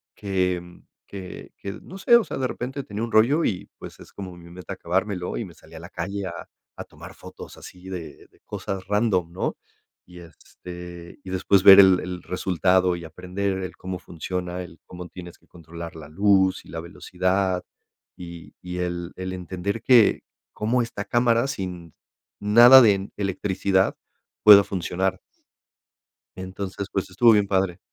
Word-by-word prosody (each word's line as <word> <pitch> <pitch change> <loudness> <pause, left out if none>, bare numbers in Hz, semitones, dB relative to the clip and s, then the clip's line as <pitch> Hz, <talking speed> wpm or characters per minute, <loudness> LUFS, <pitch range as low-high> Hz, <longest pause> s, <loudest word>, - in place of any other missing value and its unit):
que 90 -3 -2 0.3
que 95 -2 -9
que 100 - -6
no 190 - -11
sé. 235 +5 +5
O 235 - +5
sea, - - -6
de 130 -1 0
repente 130 +3 -5
tenía 105 +1 -5
un 115 - -4
rollo 130 +10 +4
y 90 - -3
pues - - -11
es - - -14
como 95 -3 -8
mi 85 0 -14
meta 90 0 -8
acabármelo 90 +1 -2
y - - -3
me 90 - -13
salí 80 0 -19
a - - -8
la 85 - -10
calle 100 +3 -5
a 85 - -8 0.3
a - - -6
tomar - - -13
fotos - - -12
así 90 +1 -13
de, 90 -4 -8
de - - -28
cosas 95 -1 -5
random, 100 -5 +1
¿no? 90 - -3 0.5
Y 90 0 -14
este, 85 0 -11
y 95 - -9
después 95 +1 +2
ver 95 0 +10
el 95 -2 +7
el 90 -1 -6
resultado 90 0 +1
y 85 -1 -8
aprender 90 +4 -4
el 95 -1 -6
cómo 95 0 -5
funciona, 90 +1 -5
el 85 -1 -13
cómo 90 0 -9
tienes 90 -2 -11
que - - -30
controlar 85 0 -10
la 80 -2 -10
luz 95 +2 +2
y - - -16
la 80 - -6
velocidad 90 +2 -1 0.5
y 85 -2 -10
y 90 0 -6
el 85 -1 -4
el 95 0 -5
entender 95 +4 -4
que 120 -5 +5 0.3
cómo 115 +4 0
esta 120 - -5
cámara, 120 +1 +2
sin 90 - -6 0.5
nada 120 +6 +8
de 100 -4 +3
electricidad, 95 -1 0 0.5
pueda 100 -1 +10
funcionar. 95 0 -2 1.2
Entonces, 95 +1 -6
pues 95 - -2
estuvo 115 +5 +5
bien, 105 -2 +3
padre. 95 -2 0
95 Hz, 170 wpm, -24 LUFS, 90-100 Hz, 1.2 s, ver